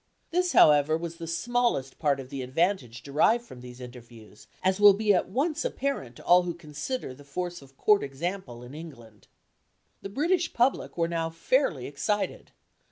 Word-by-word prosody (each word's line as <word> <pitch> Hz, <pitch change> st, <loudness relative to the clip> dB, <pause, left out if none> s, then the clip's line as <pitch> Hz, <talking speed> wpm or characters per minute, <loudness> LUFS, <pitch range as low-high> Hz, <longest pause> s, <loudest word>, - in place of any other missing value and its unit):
This, 360 Hz, +1 st, +1 dB
however, 150 Hz, +1 st, +6 dB
was 170 Hz, 0 st, -6 dB
the 165 Hz, -1 st, -7 dB
smallest 170 Hz, -, -1 dB
part 145 Hz, -3 st, +1 dB
of 130 Hz, -1 st, -8 dB
the 135 Hz, -, -4 dB
advantage 130 Hz, -, -1 dB
derived 190 Hz, +12 st, +2 dB
from 125 Hz, -, -12 dB
these 125 Hz, 0 st, -11 dB
interviews, 120 Hz, -4 st, -13 dB, 0.2 s
as 190 Hz, +1 st, +2 dB
will 205 Hz, -1 st, +8 dB
be 210 Hz, 0 st, +3 dB
at 180 Hz, -, +1 dB
once 300 Hz, -, -1 dB
apparent 195 Hz, -, -3 dB
to -, -, -14 dB
all 180 Hz, +1 st, +6 dB
who 175 Hz, -1 st, -4 dB
consider 155 Hz, -, -5 dB
the 145 Hz, +3 st, -15 dB
force 175 Hz, +4 st, -5 dB
of 135 Hz, -1 st, -18 dB
Court 210 Hz, -1 st, +4 dB
example 140 Hz, -3 st, -5 dB
in 125 Hz, +2 st, -11 dB
England. 120 Hz, -10 st, -12 dB, 0.7 s
The 195 Hz, -, -6 dB
British 330 Hz, -, 0 dB
public 245 Hz, -4 st, +1 dB
were 165 Hz, -1 st, +1 dB
now 165 Hz, -1 st, -2 dB
fairly 165 Hz, -, 0 dB
excited. 150 Hz, +9 st, -2 dB
165 Hz, 170 wpm, -27 LUFS, 135-205 Hz, 0.7 s, will